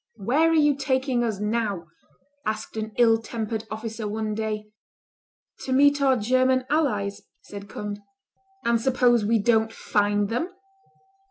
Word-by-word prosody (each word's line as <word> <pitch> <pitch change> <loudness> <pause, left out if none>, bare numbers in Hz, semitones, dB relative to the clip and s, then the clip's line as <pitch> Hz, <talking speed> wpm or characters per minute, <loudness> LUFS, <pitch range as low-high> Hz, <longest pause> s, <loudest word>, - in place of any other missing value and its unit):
"Where 285 +11 +2
are - - +2
you 295 -2 +4
taking 260 -2 0
us 220 -4 -2
now?" 210 -4 -1 0.6
asked 215 +1 -4
an 220 0 -4
ill 225 -2 +4
tempered 220 -1 -4
officer 220 0 -5
one 215 0 -3
day. 215 0 -3 1.0
"To 260 - -4
meet 285 +2 +4
our 265 -2 +4
German 255 +3 +2
allies," 210 -11 0 0.2
said 200 -1 -10
Conde. 205 0 -5 0.7
"And 235 -1 +2
suppose 245 -2 +3
we 225 +2 +2
don't 225 +1 +2
find 205 -1 0
them?" 250 +10 -1
225 Hz, 140 wpm, -25 LUFS, 210-255 Hz, 1.0 s, you